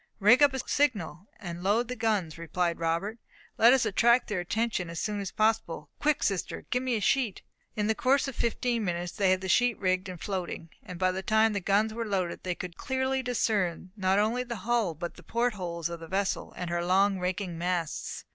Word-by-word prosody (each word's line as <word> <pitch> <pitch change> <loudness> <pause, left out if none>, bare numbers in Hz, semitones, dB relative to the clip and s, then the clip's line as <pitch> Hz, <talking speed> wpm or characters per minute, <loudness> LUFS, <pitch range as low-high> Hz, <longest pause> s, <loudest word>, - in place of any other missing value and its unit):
"Rig 220 +7 +6
up 285 -1 +7
a - - -1
signal, 205 - 0
and 175 -4 -6
load 210 +6 +2
the 250 - -4
guns," 210 -9 -1
replied 170 +1 -1
Robert. 170 +7 -1 0.4
"Let 230 +2 +8
us 265 -1 +4
attract 235 +5 +3
their 205 -4 -1
attention 200 0 -1
as 170 -1 -5
soon 210 -1 -2
as 195 -2 -3
possible. 215 -9 0
Quick, 300 -1 +1
sister, 195 -3 -2
get 250 - +1
me 255 -2 0
a - - 0
sheet!" 230 0 +1 0.3
In 210 - 0
the 220 - +2
course 265 +6 +2
of 270 - -5
fifteen 235 0 0
minutes 175 -2 -2
they 195 -2 +1
had 185 0 +2
the 190 - -4
sheet 245 +5 +3
rigged 185 0 0
and 180 -2 -7
floating; 180 -4 -4
and 180 - -9
by 185 +1 +2
the 185 +1 -3
time 220 +2 +3
the 200 - 0
guns 205 +3 +1
were 230 +1 -3
loaded, 185 -4 -2
they 180 -1 -2
could 175 -2 -7
clearly 265 0 -1
discern 205 -8 -1
not 190 -1 +1
only 225 +4 +1
the 235 -6 -7
hull, 230 -8 +1
but 170 +3 -6
the - - -12
port 235 +6 0
holes 170 -4 -3
of 170 0 -6
the 165 - -9
vessel, 195 +2 -1
and 180 -1 -4
her 175 0 0
long 190 +2 +3
raking 180 -1 -3
masts. 175 -2 -3
200 Hz, 215 wpm, -28 LUFS, 180-230 Hz, 0.4 s, Let